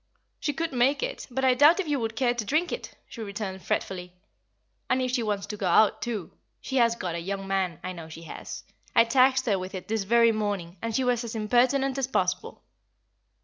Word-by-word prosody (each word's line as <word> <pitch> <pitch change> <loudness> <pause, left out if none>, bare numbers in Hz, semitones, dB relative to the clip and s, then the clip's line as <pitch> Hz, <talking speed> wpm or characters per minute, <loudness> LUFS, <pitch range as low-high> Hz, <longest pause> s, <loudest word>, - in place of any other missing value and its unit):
"She 295 - 0
could 320 +2 -3
make 260 - +2
it, - - -4
but 265 +2 -1
I 260 - +6
doubt 295 +8 +6
if 375 - -1
you 290 -2 0
would 225 -1 -3
care 245 0 +2
to 240 -2 -3
drink 310 - 0
it," - - -6
she 230 - -9
returned, 200 -2 -5
fretfully. 180 -2 -3 0.8
"And 255 -1 +1
she 250 -1 +1
wants 205 -3 -1
to 210 - -6
go 195 - -1
out, 200 +4 +4
too. 215 -8 -4 0.3
She 265 - -3
has 235 -2 +4
got 180 -6 -4
a 170 - -3
young 195 +3 -4
man, 190 -3 -1
I 185 - -3
know 165 -3 -9
she 165 +1 -10
has; 165 - -8 0.3
I 230 - +8
taxed 260 +2 +3
her 200 -5 +1
with 185 +2 -6
it 185 - -7
this 220 -2 -1
very 230 +2 +5
morning, 200 -5 -3
and 230 -1 -3
she 265 - +2
was 245 -1 +1
as 230 -1 -6
impertinent 255 +5 +2
as 265 - 0
possible." 265 - -1
230 Hz, 220 wpm, -27 LUFS, 195-260 Hz, 0.8 s, I